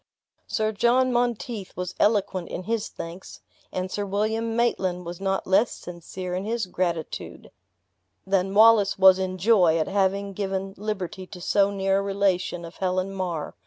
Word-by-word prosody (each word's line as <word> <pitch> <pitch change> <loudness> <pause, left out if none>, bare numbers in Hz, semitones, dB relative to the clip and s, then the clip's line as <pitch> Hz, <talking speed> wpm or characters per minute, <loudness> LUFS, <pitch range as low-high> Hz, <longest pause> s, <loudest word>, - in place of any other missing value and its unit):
Sir 215 0 0
John 245 +4 +2
Monteith 240 -4 -2
was 180 0 -4
eloquent 200 -4 +1
in 185 - -5
his 225 +1 -2
thanks. 170 +3 -9 0.3
And 185 0 -3
Sir 205 - -2
William 220 +3 -1
Maitland 185 -7 0
was 175 +2 -7
not 195 0 -1
less 200 +5 +3
sincere 180 +1 -7
in 185 +1 -2
his 225 +1 -1
gratitude, 175 -3 -4 0.7
than 195 0 0
Wallace 220 -2 +6
was 190 -1 +7
in 185 0 -2
joy, 185 -5 +4
at 160 - 0
having 200 0 0
given 195 -1 -3
liberty 195 -2 -4
to 180 - -10
so 195 +3 +2
near 195 -1 +1
a - - 0
relation 195 -3 0
of 165 - -11
Helen 185 +1 -1
Mar. 180 -5 -3
195 Hz, 160 wpm, -25 LUFS, 185-210 Hz, 0.7 s, was